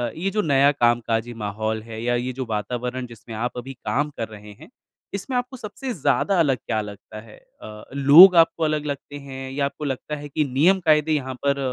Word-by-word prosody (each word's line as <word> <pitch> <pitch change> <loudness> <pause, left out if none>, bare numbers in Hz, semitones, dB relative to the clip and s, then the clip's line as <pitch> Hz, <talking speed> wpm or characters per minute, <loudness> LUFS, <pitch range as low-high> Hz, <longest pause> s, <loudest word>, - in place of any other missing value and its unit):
ये 185 +4 -2
जो 210 +2 0
नया 140 -3 +4
कामकाजी 120 -2 0
माहौल 110 0 -3
है, 115 -1 -8
या 120 0 +1
ये 125 +1 -2
जो 130 0 -4
वातावरण 125 +4 -3
जिसमें 115 -1 -11
आप 120 +2 -3
अभी 135 +2 -6
काम 145 +4 -2
कर 115 - -3
रहे 105 -1 -12
हैं - - -14 0.4
इसमें 200 +6 -4
आपको 250 +1 -4
सबसे 220 +4 -6
ज़्यादा 170 +5 +1
अलग 135 -6 +2
क्या 110 - -3
लगता 105 +1 -10
है? 110 -1 -15 0.2
अ, 105 0 -10
लोग 150 +7 +8
आपको 165 0 +4
अलग 155 -1 0
लगते 145 0 -6
हैं? 135 -1 -8
या 140 +1 -1
आपको 150 +2 -5
लगता 140 +2 -4
है 145 0 -9
कि 150 +2 0
नियम-कायदे 155 +2 +3
यहाँ 130 -3 -2
पर 140 0 +2
135 Hz, 200 wpm, -23 LUFS, 115-155 Hz, 0.4 s, लोग